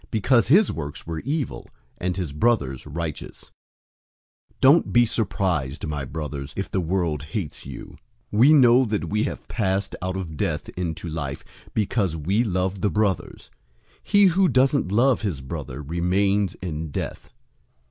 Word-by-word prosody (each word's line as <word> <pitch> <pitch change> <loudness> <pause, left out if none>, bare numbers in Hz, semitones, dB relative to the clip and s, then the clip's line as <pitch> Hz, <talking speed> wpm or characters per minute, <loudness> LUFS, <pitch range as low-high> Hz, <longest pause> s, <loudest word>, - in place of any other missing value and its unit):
Because 115 +2 +3
his 185 - +5
works 75 -3 -6
were 80 -1 -4
evil, 145 - -3 0.3
and 90 0 -2
his 85 -7 -3
brother's 75 - 0
righteous. 80 0 -6 1.0
003:013 - - -38
Don't 140 +5 +5
be 120 0 +6
surprised, 90 - -1
my 75 -3 -3
brothers, 70 -1 -5
if 95 - -3
the 95 - 0
world 85 -3 -1
hates 75 +1 -5
you. - - -9 0.4
003:014 105 - 0
We 140 +6 +7
know 130 -2 +6
that 105 -2 -2
we 105 +1 +1
have - - -6
passed 95 -2 -1
out 95 +1 -2
of 80 -5 -6
death - - -2
into 85 -1 -4
life, 75 -4 -4 0.3
because 100 -5 0
we 95 +10 +1
love 95 -2 -1
the 105 - +2
brothers. 105 -3 -2 0.5
He 205 -1 +4
who 185 +1 +4
doesn't 130 - +2
love 125 +4 +3
his 95 -10 -2
brother 65 +1 -6
remains 95 +5 +1
in 80 -2 -4
death. - - -5
95 Hz, 155 wpm, -24 LUFS, 80-115 Hz, 1.0 s, We